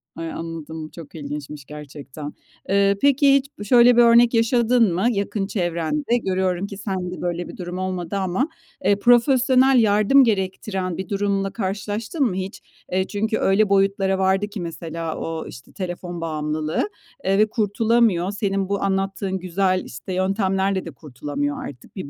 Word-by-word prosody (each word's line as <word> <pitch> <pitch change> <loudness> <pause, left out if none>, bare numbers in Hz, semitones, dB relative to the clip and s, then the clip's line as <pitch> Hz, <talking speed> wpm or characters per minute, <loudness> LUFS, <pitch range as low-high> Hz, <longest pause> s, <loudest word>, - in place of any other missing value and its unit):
Ay 165 0 -5
anladım, 160 -1 -6
çok 165 -2 -12
ilginçmiş 145 -1 -7
gerçekten. 145 0 -9 0.4
Eee, 200 0 +3
peki 280 0 +5
hiç 270 -7 -3
şöyle 240 +1 +6
bir - - +8
örnek 235 0 +6
yaşadın 230 -2 +3
mı 185 +5 0
yakın 200 -1 -2
çevrende? 195 - -1
Görüyorum 185 0 0
ki 200 - -8
sen 190 -3 -3
de 185 - -7
böyle 175 0 -2
bir - - -10
durum 180 0 -5
olmadı 185 -1 -3
ama, 190 +8 0 0.4
eee, 200 +1 +5
profesyonel 255 +2 +4
yardım 215 +5 +5
gerektiren 190 -4 -1
bir 190 -2 -5
durumla 200 -1 0
karşılaştın 210 - -3
mı 205 -7 -1
hiç? 190 +1 -5 0.3
Eee, 185 +1 0
çünkü 220 +1 -1
öyle 195 +2 +3
boyutlara 195 -1 +2
vardı 190 +2 +1
ki 205 -2 -7
mesela 165 -1 -5
o, 165 -1 -4
işte, 125 - -12
telefon 175 -2 -5
bağımlılığı, 155 - -2 0.4
eee, 195 +1 +2
ve 215 - +5
kurtulamıyor. 215 -3 +2
Senin 195 -2 -1
bu 200 0 -1
anlattığın 195 0 -1
güzel, 185 +1 0
işte, 130 +10 -7
yöntemlerle 190 0 0
de - - -6
kurtulamıyor 160 - -4
artık, 125 -4 -11
bir 185 -8 -6
195 Hz, 155 wpm, -22 LUFS, 175-215 Hz, 0.4 s, bir